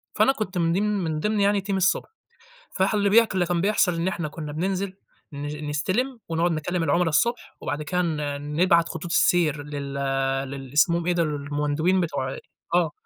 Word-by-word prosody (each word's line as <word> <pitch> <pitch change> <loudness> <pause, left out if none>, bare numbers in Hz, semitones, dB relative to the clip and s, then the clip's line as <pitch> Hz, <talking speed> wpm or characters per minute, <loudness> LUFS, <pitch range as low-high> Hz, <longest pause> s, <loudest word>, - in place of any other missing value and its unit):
فأنا 270 - +5
كنت 205 -6 -4
من 165 -1 +2
ديم 195 +4 +1 0.2
من 155 -2 -2
ضمن 210 +5 0
يعني 200 0 +2
team - - +1
الصبح، 190 +1 +1 0.7
فح 190 +2 +2
اللي 205 -1 +2
بيح 230 +3 +6
اللي 185 -2 +1
كان 175 -1 0
بيحصل 200 -2 +2
إن 165 +2 -1
إحنا 175 -4 -2
كنا 150 0 -7
بننزل 190 +4 -2 0.4
ن 145 +1 -5
نستلم 220 - -1
ونقعد 165 +1 +1
نكلم 165 +2 -1
العملا 170 +1 +2
الصبح، 235 +11 0
وبعد 145 +1 -3
كده 180 +4 0
ن 165 -3 -1 0.4
نبعت 170 -1 +4
خطوط 160 +1 -6
السير 155 -6 +3
لل 145 -1 -6 0.6
للي 135 -1 -8
اسمهم 170 +3 +3
إيه 180 - +3
ده، 170 -1 +2
ال 155 - -1
المندوبين 145 +5 0
بتوع 135 -6 -2 0.4
آه، 170 -3 +3
170 Hz, 185 wpm, -25 LUFS, 150-190 Hz, 0.7 s, بيح